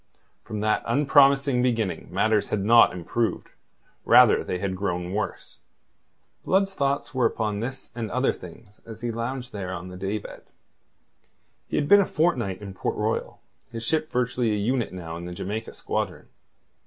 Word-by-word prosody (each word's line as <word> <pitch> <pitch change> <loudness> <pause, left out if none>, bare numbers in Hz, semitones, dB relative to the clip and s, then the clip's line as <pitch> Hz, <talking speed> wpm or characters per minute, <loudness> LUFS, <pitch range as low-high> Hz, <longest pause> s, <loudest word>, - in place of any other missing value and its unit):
From 105 -1 -5
that 110 0 +1
unpromising 140 0 +4
beginning 115 -6 -1
matters 105 +3 +1
had 100 -2 -1
not 115 +2 +7
improved; 95 +6 -2 0.5
rather - - +7
had - - -6
they 90 - -1
grown 90 -1 -3
worse. 105 +1 -4 0.8
Blood's 195 +1 +2
thoughts 140 -5 -1
were 130 -3 +3
upon 105 -3 -2
this 130 +4 -6
and 115 -2 -4
other 125 +4 +1
things 100 +4 -13
as 115 -1 -10
he 120 -1 -2
lounged 120 +2 -4
there 95 -3 -4
on 90 0 -6
the 90 - -9
day 95 +3 -2
bed. 100 - -10 1.3
He - - -4
had 145 - +1
been 205 +5 +7
a - - +1
fortnight 120 - 0
in 100 -1 -7
Port - - -3
Royal, - - -2 0.3
his 115 -1 -6
ship 155 +5 0
virtually 125 -1 0
a 105 - +1
unit 120 +3 0
now 85 -3 -7
in 85 - -7
the 90 - -6
Jamaica 105 +5 -5
squadron. - - -3
115 Hz, 165 wpm, -25 LUFS, 100-130 Hz, 1.3 s, not